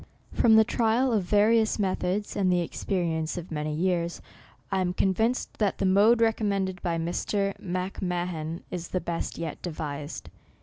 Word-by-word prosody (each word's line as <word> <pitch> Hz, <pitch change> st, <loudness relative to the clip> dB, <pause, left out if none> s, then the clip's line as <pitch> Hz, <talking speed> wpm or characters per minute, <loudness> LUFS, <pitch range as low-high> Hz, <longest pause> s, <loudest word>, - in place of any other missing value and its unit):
From 225 Hz, -2 st, +5 dB
the 220 Hz, -, +8 dB
trial 235 Hz, +3 st, +1 dB
of 205 Hz, -5 st, +1 dB
various 215 Hz, +3 st, +3 dB
methods, 195 Hz, 0 st, -1 dB
and 190 Hz, -2 st, +2 dB
the 180 Hz, -1 st, +2 dB
experience 165 Hz, -2 st, -2 dB
of 175 Hz, -1 st, -7 dB
many 150 Hz, -1 st, -2 dB
years, 170 Hz, +1 st, 0 dB, 0.5 s
I 190 Hz, -1 st, +1 dB
am 180 Hz, -1 st, 0 dB
convinced 220 Hz, +7 st, 0 dB
that 205 Hz, -3 st, +1 dB
the -, -, 0 dB
mode 210 Hz, +5 st, +5 dB
recommended 200 Hz, -4 st, 0 dB
by 170 Hz, -2 st, -1 dB
Mr. 195 Hz, +4 st, -1 dB
M'Mahan 180 Hz, -3 st, -3 dB
is 170 Hz, -1 st, -4 dB
the 185 Hz, -, -1 dB
best 170 Hz, -1 st, -4 dB
yet 165 Hz, -2 st, -5 dB
devised. 150 Hz, -3 st, -5 dB
185 Hz, 155 wpm, -27 LUFS, 170-205 Hz, 0.5 s, the